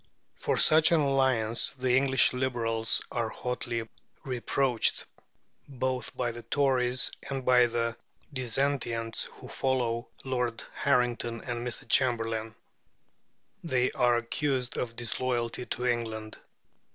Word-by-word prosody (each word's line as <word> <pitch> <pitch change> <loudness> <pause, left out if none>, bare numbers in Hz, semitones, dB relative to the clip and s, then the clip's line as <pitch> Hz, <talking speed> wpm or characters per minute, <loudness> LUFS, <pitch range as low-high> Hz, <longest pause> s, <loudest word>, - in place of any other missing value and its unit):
For - - 0
such 155 +1 +6
an 165 - +5
alliance 130 -5 +2
the 130 -1 +2
English 135 -1 +4
Liberals 115 -3 0
are 115 -2 -1
hotly 120 -1 -3 0.4
reproached, 125 -1 0 0.6
both 130 -2 -3
by 120 -2 0
the 120 +1 -8
Tories 125 0 +1 0.2
and 135 -2 -3
by 125 -1 +6
the 115 0 -1 0.4
dissentients 120 -3 -1
who - - -12
follow 120 -3 -1 0.2
Lord 125 -3 -2
Harrington 120 -3 0
and 120 -1 -4
Mr. 120 - -3
Chamberlain. 115 -3 +1 1.1
They 130 -6 +1
are 120 -1 +3
accused 125 +2 -1
of 115 -2 -3
disloyalty 120 0 -2
to 125 - -3
England. 110 -3 -2
125 Hz, 115 wpm, -29 LUFS, 115-130 Hz, 1.1 s, such